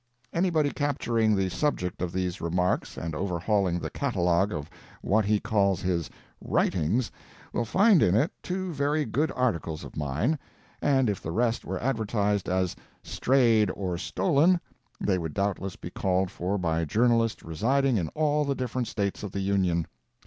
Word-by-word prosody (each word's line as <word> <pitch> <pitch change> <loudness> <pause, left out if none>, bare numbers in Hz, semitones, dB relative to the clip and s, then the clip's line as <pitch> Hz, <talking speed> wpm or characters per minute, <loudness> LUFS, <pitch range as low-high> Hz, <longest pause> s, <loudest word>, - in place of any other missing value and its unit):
Anybody 165 -5 +2
capturing 115 -7 +1
the 95 -1 +1
subject 90 - -1
of 90 -2 -1
these 90 -1 -2
remarks 90 +2 0
and 80 -1 -4
overhauling 90 +1 0
the - - -5
catalogue 95 - +1
of 75 -5 -4 0.4
what 110 +1 +2
he 105 0 +2
calls 100 -4 +1
his 85 -3 -1 0.3
"writings," 100 +9 +1 0.4
will 120 - 0
find 195 - +5
in 90 - +4
it 145 +10 +2
two 185 0 -3
very 145 +1 0
good 155 +4 0
articles 85 -11 -1
of - - -10
mine, 75 - 0 0.4
and 135 -3 +3
if 100 -3 -1
the - - -5
rest 115 +6 0
were 95 0 -3
advertised 105 -5 0
as 95 -1 0 0.3
"strayed 115 -6 +3
or 95 -3 -2
stolen," 165 - +2 0.4
they 95 -2 +1
would 80 -3 -5
doubtless 100 -1 -1
be - - -8
called 95 -1 0
for 95 +4 -2
by 80 -3 0
journalists 115 +6 +2
residing 125 - +1
in 85 -5 -1
all 150 -1 +2
the 140 -1 -1
different 125 -1 -2
States 100 -2 -2
of 105 -3 -5
the 100 - -3
Union. 95 -4 +1
105 Hz, 160 wpm, -27 LUFS, 90-130 Hz, 0.4 s, find